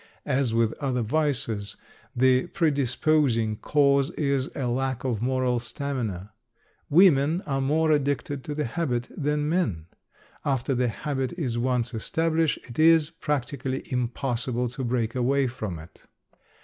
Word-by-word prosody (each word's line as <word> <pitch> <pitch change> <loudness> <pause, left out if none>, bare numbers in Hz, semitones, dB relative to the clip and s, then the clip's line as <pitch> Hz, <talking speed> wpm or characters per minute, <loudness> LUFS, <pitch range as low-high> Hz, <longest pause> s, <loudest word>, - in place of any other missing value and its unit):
As 130 -2 +1
with 115 0 +2
other 130 -4 -1
vices, 115 -6 0 0.4
the 130 +1 +3
predisposing 140 - +1
cause 140 0 +2
is 140 -3 0
a 135 - -2
lack 130 +1 -1
of 120 -5 -1
moral 125 -1 +1
stamina. 115 -5 -4 0.6
Women 160 -1 +5
are 135 -5 -2
more 155 +4 +2
addicted 140 -2 0
to 150 - -4
the 150 - -1
habit 120 -3 -2
than 150 0 0
men. 150 - 0 0.6
After 135 -1 0
the 125 0 +1
habit 135 +3 -3
is 125 -8 -2
once 125 0 0
established 160 +7 0
it 120 +2 -8
is 160 -1 +5
practically 140 -4 -3
impossible 125 0 -1
to 130 +3 -5
break 115 -2 -1
away 135 +2 +2
from 110 -8 -4
it. 80 +1 -14
130 Hz, 135 wpm, -26 LUFS, 120-145 Hz, 0.6 s, Women